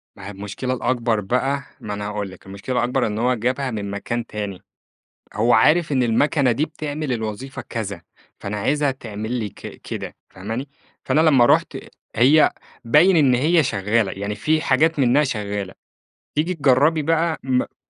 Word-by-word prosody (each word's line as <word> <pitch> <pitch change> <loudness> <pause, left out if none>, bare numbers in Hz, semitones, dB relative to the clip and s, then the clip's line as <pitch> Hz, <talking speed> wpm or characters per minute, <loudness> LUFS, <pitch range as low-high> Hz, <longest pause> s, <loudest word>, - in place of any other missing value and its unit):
ما 100 -1 -10
هي - - -6
المشكلة 105 +6 -4
الأكبر 120 -3 0
بقى، 135 +7 -1 0.2
ما 105 - -6
أنا 105 0 -4
هاقول 105 -2 -4
لِك، 95 - -15
المشكلة 100 +6 -6
الأكبر 125 0 +1
إن 105 +1 -3
هو 125 +2 +2
جابها 125 +3 -1
من 100 -2 -4
مكان 120 +3 -3
تاني، 100 -4 -6 0.7
هو 115 +3 +2
عارف 150 +7 +4
إن 130 -2 +2
المَكَنة 125 +2 +2
دي 145 +7 0
بتعمل 150 -2 -4
الوظيفة 110 +4 -5
كذا، 105 -4 -5 0.4
فأنا 100 +1 -5
عايزها 145 +6 +1
تعمل 110 -3 -6
لي 115 -4 -2
ك - - -12 0.2
كده، - - -6
فاهماني، 115 +9 -5 0.4
فأنا 155 - +2
لمّا 140 -7 +5
رُحت - - +2 0.4
هي 145 +6 +5 0.3
باين 165 +10 +5
إن 135 -5 +4
هي 160 +6 +3
شغّالة، 105 -2 0
يعني 100 +1 -4
في 155 +10 +1
حاجات 150 +3 +2
منها 135 +3 +4
شغّالة، 105 -6 -4 0.6
تيجي 165 +5 0
تجرّبي 145 +2 +3
بقى 165 +1 +1
م 130 -1 -1
125 Hz, 165 wpm, -21 LUFS, 105-145 Hz, 0.7 s, لمّا